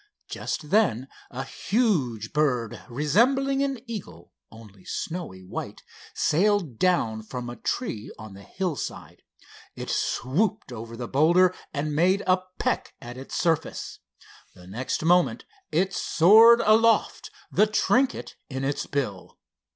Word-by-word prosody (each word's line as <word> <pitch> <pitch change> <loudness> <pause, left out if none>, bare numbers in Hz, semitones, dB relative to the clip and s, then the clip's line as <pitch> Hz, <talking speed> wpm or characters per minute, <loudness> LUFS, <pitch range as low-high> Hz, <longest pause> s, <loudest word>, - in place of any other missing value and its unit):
Just 150 -1 -5
then 170 - +2 0.2
a 130 +1 -5
huge 135 - -1
bird 125 -7 0
resembling 250 - +2
an 275 -1 -1
eagle, 90 - -8 0.2
only 105 -4 -15
snowy 160 - -5
white, 90 - -7 0.3
sailed 180 - +1
down 120 -12 +1
from 120 +3 -7
a - - -8
tree 115 - -4
on 110 -2 -10
the 100 - -12
hillside. 180 - -5 0.5
It - - -5
swooped 195 - -1
over 115 0 -8
the 120 -1 -5
boulder 170 +7 +4 0.2
and 150 0 -3
made 185 +5 +3
a 185 0 +3 0.2
peck - - -2
at 120 +1 -9
its 130 +1 -8
surface. 160 -2 -1 0.6
The 90 - -15
next 120 - -3
moment 175 +1 +3 0.3
it 190 +2 +1
soared 220 +9 +6
aloft, 225 +1 +3 0.2
the 210 - +4
trinket 250 +5 +1 0.2
in 130 -1 -4
its 140 +1 -2
bill. 125 -10 -4
155 Hz, 130 wpm, -25 LUFS, -, 0.6 s, soared